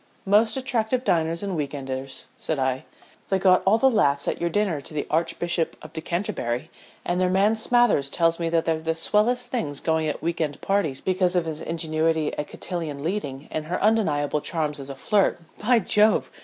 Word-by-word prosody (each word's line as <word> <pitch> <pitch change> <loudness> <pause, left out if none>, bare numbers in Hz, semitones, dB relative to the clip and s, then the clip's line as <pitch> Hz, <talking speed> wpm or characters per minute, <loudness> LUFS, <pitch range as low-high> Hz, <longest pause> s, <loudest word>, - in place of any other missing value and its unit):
"Most 215 +4 +3
attractive 255 -2 0
diners 165 -4 +1
and 195 -2 -2
weekenders," 135 -3 -4
said 160 - -2
I. 130 -1 -1 0.4
"They 195 - +2
got 185 -1 +4
all 210 +3 +6
the 265 - +4
laughs 145 - +2
at - - -2
your 170 - +1
dinner 180 -5 0
to 145 - -11
the 145 - -1
Archbishop 170 +1 0
of - - -11
Decanterbury, 160 -5 -3 0.3
and 175 +1 0
their 180 - +3
man 200 +4 +3
Smathers 225 - +2
tells 165 +2 +1
me 165 -1 -1
they're 165 0 +2 0.2
the 165 0 -1
swellest 240 +9 +2
things 150 - -2
going 160 -1 0
at 150 - -4
week 170 0 -1
end 150 -2 -2
parties 195 -9 0
because 185 -1 +1
of 175 -2 +2
his 155 -2 -5
ingenuity 160 -1 0
at 150 - -4
cotillion 160 -6 -5
leading 155 -6 -3
and 155 -1 -3
her 175 +3 -2
undeniable 155 -10 +1
charms 150 -3 -2
as 135 0 -8
a 135 - -6
flirt. 200 +8 +2 0.2
By 240 +3 +3
Jove! 215 +1 +3
170 Hz, 185 wpm, -24 LUFS, 150-205 Hz, 0.4 s, all